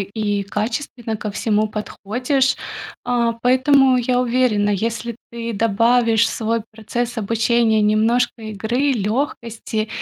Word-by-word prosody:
и 205 +1 -2
качественно 225 +2 -3
ко 210 0 -5
всему 215 +1 0
подходишь. 250 +6 -1 0.5
А, 235 -2 +1
поэтому 260 +1 +4
я 245 +1 +1
уверена, 240 -4 +2
если 230 +3 -2 0.2
ты 235 0 -5
добавишь 230 +2 +3
в - - 0
свой 225 0 -1
процесс 235 +2 -3
обучения 225 0 +2
немножко 225 +3 +2
игры, 225 +6 -1
лёгкости, 225 -1 -2
230 Hz, 115 wpm, -20 LUFS, 215-245 Hz, 0.5 s, поэтому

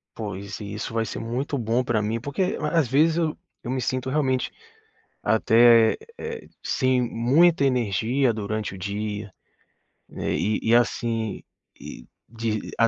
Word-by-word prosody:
Pois, 100 -2 -6
e 105 -1 -6
isso 110 +1 -5
vai 115 0 0
ser 100 - -6
muito 125 +5 -2
bom 120 +1 0
pra 120 -3 0
mim, 110 +2 -1
porque 145 +8 -1 0.2
às 165 -7 +2
vezes 155 +6 +3
eu 160 -2 0 0.3
eu 120 - -4
me 130 0 -1
sinto 130 +1 -2
realmente 130 -3 0 0.7
até, 115 0 +5 0.2
eh, 460 0 -6 0.2
sem 130 -1 +2
muita 140 +7 +3
energia 125 +1 +1
durante 105 -1 -3
o - - -9
dia, 105 +1 -4 0.8
eh, - - -3
e 105 +1 0
e, - - +5
assim, 115 -2 0 0.4
e - - -10 0.2
de 110 -2 -3
ah 115 - +6
115 Hz, 150 wpm, -24 LUFS, 110-130 Hz, 0.8 s, ah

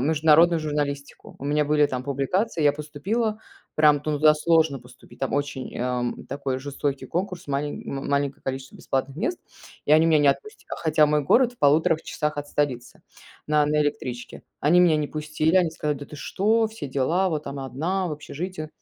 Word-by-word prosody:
международную 160 +3 +4
журналистику. 145 -2 -4
У 140 - -9
меня 150 +1 +1
были 150 0 +4
там 130 -2 -4
публикации. 150 - -1
Я 145 - +5
поступила, 195 +10 -2 0.4
прям 150 -2 +4
туда 150 +1 +3
сложно 160 -3 +2
поступить, 125 +1 -17
там 135 - -2
очень, 140 -2 -3
ам, 125 -1 -2
такой 135 -1 -3
жестокий 140 0 -3
конкурс, 180 -1 -4
малень 145 +1 -3
м 135 0 -4
маленькое 140 -1 -1
количество 135 0 -5
бесплатных 135 +1 -3
мест, 345 - -2 0.5
и 150 - +3
они 155 +1 +6
меня 160 -2 +4
не 145 -1 +4
отпустят, 425 - -2
а, - - -3
хотя 155 -2 +3
мой 150 0 +1
город 245 - +4
в - - -36
1,5 155 +2 +3
часах 150 -1 -3
от 145 0 -4
столицы 130 -5 -2 0.4
на 150 -1 +3
на 150 0 +2
электричке. 125 -4 -4 0.2
Они 160 +5 +4
меня 170 -3 +5
не 150 -1 -1
пустили, 155 +3 0
они 175 -3 +3
сказали: 150 -2 -2
"Да 145 - -7
ты 150 - -11
что? 220 +9 +1
Все 220 -9 -7
дела, 140 +8 +1
вот 155 -2 -3
там 140 0 -6
одна 165 +9 -2
в 155 - -4
общежитии". 155 +2 -6
150 Hz, 185 wpm, -24 LUFS, 140-160 Hz, 0.5 s, они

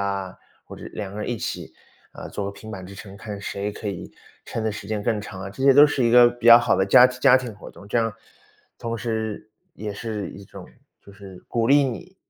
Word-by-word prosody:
啊， 100 -2 -3 0.3
或 - - -11
者 - - -10
2 100 -2 -5
个 105 - -7
人 - - -4
一 120 - -2
起， - - -6 0.4
呃， - - -9
做 100 - -4
个 - - -3
平 110 +2 -12
板 95 -3 -8
支 100 - -11
撑， 100 0 -11
看 105 -1 -7
谁 100 +1 -4
可 105 - -9
以 100 -4 -5 0.4
撑 115 - -4
得 110 - 0
时 100 - -8
间 105 0 -3
更 110 -1 0
长 95 -2 -8
啊， 95 - -6
这 120 +6 -8
些 135 0 +6
都 145 +2 +9
是 145 -3 -1
一 115 - +3
个 120 0 +8
比 120 -1 -6
较 115 0 +11
好 120 - +1
的 95 - +1
家 125 +5 +8
家 130 +1 +4
庭 125 -4 -4
活 105 - -12
动， 100 - -15
这 105 - 0
样 115 -1 +1 0.7
同 115 0 -4
时 110 -2 -4 0.2
也 105 -1 -6
是 105 0 -5
一 100 - -11
种 95 - -12 0.4
就 100 - -14
是 95 -2 -13
鼓 115 -1 0
励 140 +3 +5
你 135 +9 -6
110 Hz, 260 characters per minute, -23 LUFS, 100-120 Hz, 0.7 s, 较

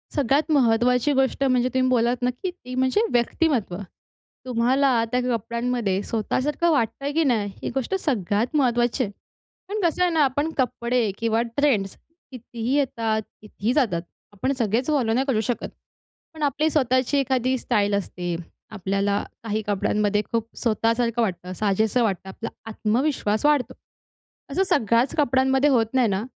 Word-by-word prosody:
सगळ्यात 285 +3 +1
महत्त्वाची 250 0 +3
गोष्ट 270 +1 +1
म्हणजे 255 -1 +2
तुम्ही 255 0 +2
बोललात 245 0 +1
ना, 250 - +2
की 355 +9 -4
ती 255 -8 -10
म्हणजे 260 +10 +2
व्यक्तिमत्त्व. 240 - +1 0.7
तुम्हाला 250 0 +2
त्या 250 - +2
कपड्यांमध्ये 235 -3 -1
स्वतःसारखं 280 +9 0
वाटतंय, 275 +1 0
की 325 +2 +2
नाही. 215 -7 +1
ही - - -1
गोष्ट 270 +9 -1
सगळ्यात 230 - -1
महत्त्वाची 245 -1 +2
आहे. 205 - -4 0.6
पण 425 +1 -2
कसं 340 +1 +1
आहे 355 - +2
ना, 315 -2 +3
आपण 285 +4 -1
कपडे 240 -2 0
किंवा 225 0 +1 0.2
ट्रेंड्स 225 -10 +1 0.4
कितीही 240 +1 -4
येतात, 225 -5 0 0.2
कितीही 215 +2 -3
जातात, 215 - +1 0.3
आपण 260 +7 -1
सगळेच 230 +4 0
फॉलो 260 -7 +1
नाही 260 +3 +1
करू 220 -5 +1
शकत. 235 +2 -2 0.7
पण 310 -1 -6
आपली 295 +3 +1
स्वतःची 260 -1 +1
एखादी 260 -1 +1
स्टाईल 205 -3 0
असते. 180 -3 -3 0.4
आपल्याला 200 0 -1 0.2
काही 220 -1 -2
कपड्यांमध्ये 205 +1 +1
खूप 230 -1 -1
स्वतःसारखं 230 +1 +1
वाटतं, 185 -3 -2
साजेसं 215 +4 +1
वाटतं, 190 -3 -2
आपला 225 +4 -6 0.2
आत्मविश्वास 220 +1 0
वाढतो. 270 -4 +2 0.8
असं 385 - +2
सगळ्याच 235 - +2
कपड्यांमध्ये 265 0 +3
होत 240 -5 +3
नाही 255 -3 +3
ना. 200 +1 -1
245 Hz, 145 wpm, -24 LUFS, 220-270 Hz, 0.8 s, महत्त्वाची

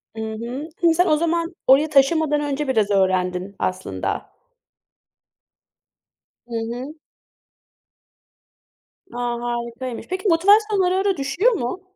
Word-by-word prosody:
I 220 - -5
hı. 235 +7 -5
Hani, 335 -1 +5
sen 360 +2 +3
o 305 - +3
zaman, 335 +1 -1
oraya 275 +4 +5
taşınmadan 295 +1 +3
önce 290 0 -2
biraz 220 -6 +1
öğrendin 185 0 0
aslında? 185 0 -3 2.2
Hı 235 - -6 0.2
hı. 265 +6 -7 2.2
A! - - -7 0.2
Harikaymış. 240 +1 -5
Peki, 375 +3 -3
motivasyonun 400 +4 +4
ara, 365 +1 +1
ara 390 -2 +1
düşüyor 275 - +1
mu? 360 - -3
280 Hz, 110 wpm, -22 LUFS, 235-340 Hz, 2.2 s, Hani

